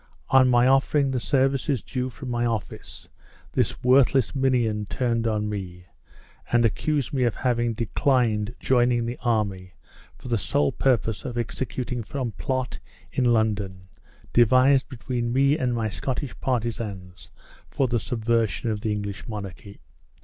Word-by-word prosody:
On 130 -1 +6
my 120 0 +4
offering 135 +1 +3
the 130 - 0
services 135 -1 +1
due 125 0 -3
from 130 0 -7
my 120 0 0
office, 115 -4 -4 0.4
this - - -1
worthless 130 -1 +4
minion 120 -6 +1
turned 115 -3 0
on 105 -1 0
me, 90 -4 -6 0.7
and 120 -1 +4
accused 145 +6 0
me 135 - 0
of 120 -3 +1
having 120 -2 0
declined 115 -1 0
joining 120 -2 +2
the 120 +1 -5
army 100 -6 -1 0.4
for - - -11
the 120 -3 0
sole 75 -6 +1
purpose 115 -5 0
of 125 -3 -5
executing 125 +1 -3
some 125 0 -4
plot 130 +4 -3 0.3
in 130 - 0
London, 105 -5 0 0.4
devised 130 +3 +4
between 120 -1 -3
me 140 +3 +3
and 125 -6 -1
my 115 -2 -1
Scottish 130 +5 -3
partisans 110 -7 -3 0.4
for 135 - 0
the 120 -1 0
subversion 115 +1 0
of 105 -1 -3
the 110 -1 -1
English 100 -1 -4
monarchy. 100 -2 -8
120 Hz, 140 wpm, -25 LUFS, 105-130 Hz, 0.7 s, On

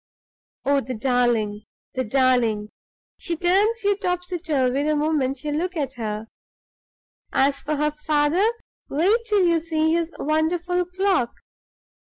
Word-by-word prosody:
Oh, 280 0 +3
the 255 -1 -5
darling! 230 -3 +1 0.3
the 260 - -1
darling! 235 -4 +2 0.5
she 340 - -2
turns 400 +7 +2
you 405 0 +3
topsy 360 -2 -2
turvy 275 -5 +1
the 305 +1 +1
moment 295 -3 0
you 300 - -2
look 350 +4 -2
at 275 -3 -2
her. 215 -3 -4 1.1
As 275 +1 +2
for 305 - -2
her 300 +1 +1
father, 300 +6 +2 0.4
wait 365 +11 +3
till 415 -4 +3
you 335 -1 +3
see 320 -1 0
his 335 0 0
wonderful 340 +4 0
clock! 365 -8 0
305 Hz, 135 wpm, -23 LUFS, 260-355 Hz, 1.1 s, Oh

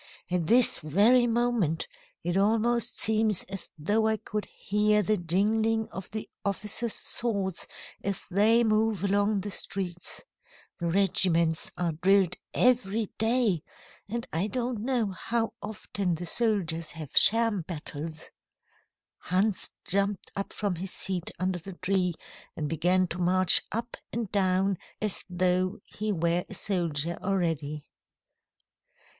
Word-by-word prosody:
At 175 -3 0
this 240 +4 +4
very 215 - +4
moment, 230 -9 0 0.4
it 175 - -1
almost 230 +4 +2
seems 215 -3 +2
as 195 -2 -7
though 210 +8 +1
I 220 0 +1
could 210 +1 -4
hear 210 +1 +1
the 215 +3 +2
jingling 215 +5 +1
of 190 - -8
the 215 0 -6 0.2
officers' 210 +3 -1
swords 200 -6 -1 0.4
as 200 -1 -2
they 220 +5 +4
move 215 -3 +1
along 200 +1 +1
the 205 +2 -5
streets. 180 -3 -4 0.6
The 170 - -2
regiments 170 -3 +2
are 175 -2 0
drilled 185 +2 +3 0.2
every 225 -4 +1
day, 225 -6 +2 0.5
and 235 +2 -3
I 170 +6 +1
don't 245 +1 -2
know 235 -3 0
how 225 +4 -2
often 200 -3 -3
the 175 +2 -6
soldiers 170 -6 +1
have 155 -3 -8
sham 225 -3 +5
battles." 155 -1 -7 0.9
Hans 190 +3 0 0.2
jumped 200 0 0
up 200 - -3
from 200 -5 -2
his 190 +3 -4
seat 185 -3 -1
under 185 0 -1
the 190 +3 -9
tree 180 -1 0 0.4
and 150 - -3
began 180 +4 +2
to 175 - -5
march 180 0 +7
up 230 +2 -4
and 230 -4 -3
down 190 -1 +1 0.2
as 210 -3 -2
though 185 +2 +1
he 215 +1 -4
were 170 -1 +1
a 205 - -6
soldier 170 -5 -1
already. 160 -6 -1
195 Hz, 130 wpm, -28 LUFS, 175-220 Hz, 0.9 s, march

